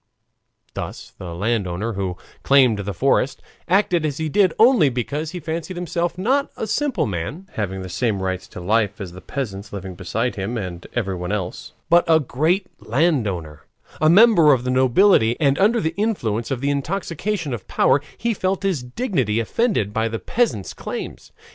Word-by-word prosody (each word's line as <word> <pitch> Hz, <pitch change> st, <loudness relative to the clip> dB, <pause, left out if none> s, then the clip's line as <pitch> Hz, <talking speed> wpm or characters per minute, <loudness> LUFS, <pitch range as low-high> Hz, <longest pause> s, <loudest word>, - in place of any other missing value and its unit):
Thus -, -, -6 dB
the 85 Hz, -2 st, -6 dB
landowner, 105 Hz, +1 st, -1 dB
who 95 Hz, -3 st, -3 dB, 0.2 s
claimed 130 Hz, -6 st, +4 dB
the 100 Hz, 0 st, -3 dB
forest, 135 Hz, +4 st, +1 dB, 0.3 s
acted 180 Hz, -2 st, +2 dB
as 145 Hz, -3 st, -2 dB
he 160 Hz, -1 st, -2 dB
did 190 Hz, +2 st, +3 dB
only 225 Hz, -, +6 dB
because 140 Hz, +5 st, -3 dB
he 180 Hz, -, -6 dB
fancied 165 Hz, +3 st, -4 dB
himself 175 Hz, 0 st, -2 dB
not 265 Hz, +9 st, +1 dB
a -, -, -2 dB
simple 240 Hz, -, 0 dB
man, 110 Hz, -, -4 dB
having 95 Hz, -3 st, -3 dB
the -, -, -6 dB
same 100 Hz, +3 st, -1 dB
rights 95 Hz, 0 st, -3 dB
to -, -, -10 dB
life 105 Hz, +2 st, +1 dB
as 95 Hz, -3 st, -6 dB
the 90 Hz, +1 st, -11 dB
peasants 105 Hz, -7 st, -5 dB
living 95 Hz, -2 st, -6 dB
beside 110 Hz, +7 st, -2 dB
him 100 Hz, +5 st, -3 dB
and 90 Hz, -4 st, -6 dB
everyone 95 Hz, -5 st, -2 dB
else, 90 Hz, -2 st, -4 dB
but 170 Hz, +1 st, +5 dB
a 160 Hz, -1 st, +5 dB
great 160 Hz, +8 st, 0 dB
landowner, 105 Hz, -, 0 dB, 0.4 s
a 155 Hz, -, +5 dB
member 175 Hz, -5 st, +7 dB
of 125 Hz, -2 st, 0 dB
the 125 Hz, -, -1 dB
nobility, 130 Hz, -, +4 dB
and 140 Hz, -3 st, +2 dB
under 220 Hz, +4 st, +4 dB
the 160 Hz, -3 st, -1 dB
influence 120 Hz, -, -1 dB
of 130 Hz, -3 st, -2 dB
the 140 Hz, +1 st, +1 dB
intoxication 170 Hz, +2 st, -2 dB
of 110 Hz, -5 st, -6 dB
power 140 Hz, -, +3 dB, 0.2 s
he 235 Hz, 0 st, 0 dB
felt 190 Hz, -1 st, -1 dB
his 190 Hz, -9 st, 0 dB
dignity 125 Hz, -, -1 dB
offended 115 Hz, -, 0 dB
by 110 Hz, +1 st, +1 dB
the 115 Hz, 0 st, -3 dB
peasants' 210 Hz, -, -1 dB
claims. -, -, -7 dB
130 Hz, 175 wpm, -21 LUFS, -, 0.4 s, member